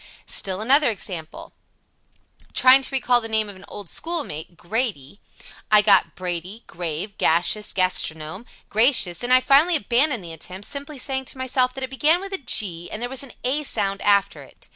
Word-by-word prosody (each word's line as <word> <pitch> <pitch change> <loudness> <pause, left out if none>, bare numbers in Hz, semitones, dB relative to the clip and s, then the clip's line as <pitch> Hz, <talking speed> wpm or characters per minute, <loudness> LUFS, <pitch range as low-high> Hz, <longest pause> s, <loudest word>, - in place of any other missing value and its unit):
Still 190 +1 0
another 275 +5 +5
example: 180 -6 -7 1.0
Trying 260 +1 +6
to 265 - -5
recall 250 -2 +2
the 225 - -7
name 220 -1 +1
of 200 - -10
an 190 +1 -14
old 205 -2 -10
schoolmate, 185 - -4
"Grady," 200 - -4 0.5
I 210 -1 +6
got 200 -3 +4
"Brady," 180 +4 -5
"grave," 175 +4 -6
"gaseous," 175 +6 +2
"gastronome," 185 +1 -2 0.2
"gracious," 215 -7 +3
and 245 - -1
I 255 - +7
finally 295 +7 +4
abandoned 250 -1 +1
the 165 -1 -7
attempt, 185 +5 -10
simply 285 +1 -6
saying 265 0 -3
to 265 - -7
myself 255 -1 0
that 265 - -6
it 260 - -5
began 305 +6 +2
with 390 +1 -8
a 385 - -3
"G," 180 -9 0
and 215 - -6
there 245 +1 -3
was 265 -1 -2
an 275 -3 -9
"a" 270 +4 0
sound 200 -8 -1
after 200 -1 +1
it. - - -17
220 Hz, 180 wpm, -22 LUFS, 185-265 Hz, 1.0 s, I